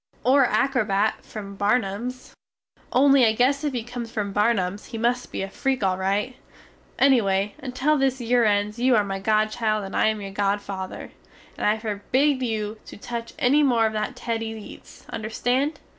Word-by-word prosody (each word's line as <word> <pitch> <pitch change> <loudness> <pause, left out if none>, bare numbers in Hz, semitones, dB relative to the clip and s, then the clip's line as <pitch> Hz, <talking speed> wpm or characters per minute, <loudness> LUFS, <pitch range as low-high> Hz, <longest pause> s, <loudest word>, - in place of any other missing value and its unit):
or 270 +1 +5
a - - 0
acrobat 215 -4 +1
from 200 -2 -8
Barnums? 215 +4 -1 0.6
only 275 0 +5
I 220 -2 +4
guess 265 +6 +2
if 295 - 0
he 240 -3 -2
comes 240 0 -6
from 210 -3 -3
Barnums 205 -2 0
he 230 - -6
must 240 +2 -1
be - - -3
a - - -3
freak 260 +4 -2
al 190 -1 +2
rite. 200 +7 -1 0.6
Ennyway 210 -7 +3
until 270 +3 0
this 265 -1 +1
yere 240 0 +2
ends 210 +1 +1
you 250 0 +4
are 210 - +4
my 195 -1 -4
godchild 215 +1 +1
and 195 - -7
I - - +3
am 220 -1 0
your 195 -1 -7
godfather, 195 -1 -3 0.4
and - - -1
I 210 +1 +3
forbid 255 +6 0
you 215 -3 -2
to - - -10
tuch 235 +2 -6
enny 275 +4 +3
more 240 -6 +3
of 220 - 0
that 215 +3 -3
Teddys 225 -2 -3
eats, 210 - -13
understand? 245 +7 -1
225 Hz, 175 wpm, -24 LUFS, 205-250 Hz, 0.6 s, or